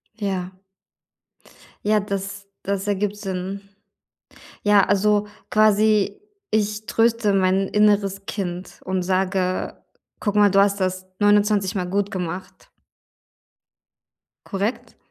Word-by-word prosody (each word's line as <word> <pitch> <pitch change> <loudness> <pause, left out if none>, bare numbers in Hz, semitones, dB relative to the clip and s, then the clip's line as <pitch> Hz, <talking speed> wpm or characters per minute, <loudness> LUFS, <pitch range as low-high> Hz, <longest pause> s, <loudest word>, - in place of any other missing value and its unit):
Ja. 190 -4 -3 1.3
Ja, 210 0 +3
das 200 0 -5 0.2
das 200 0 -2
ergibt 205 0 0
Sinn. 195 -1 -4 1.0
Ja, 205 -2 +5
also 210 +1 +2 0.2
quasi 215 - +3 0.3
ich 215 0 0
tröste 225 -2 +2
mein 190 0 +2
inneres 200 -2 +2
Kind 180 -3 -5
und 185 -1 -1
sage: 185 0 -1 0.4
„Guck 205 0 -2
mal, 205 -1 +6
du 195 - +4
hast 200 0 +3
das 185 0 -1
29 205 -1 +3
Mal 180 -2 -1
gut 200 +2 0
gemacht.“ 185 - -6 1.8
Korrekt? 200 +4 -3
200 Hz, 105 wpm, -22 LUFS, 190-210 Hz, 1.8 s, mal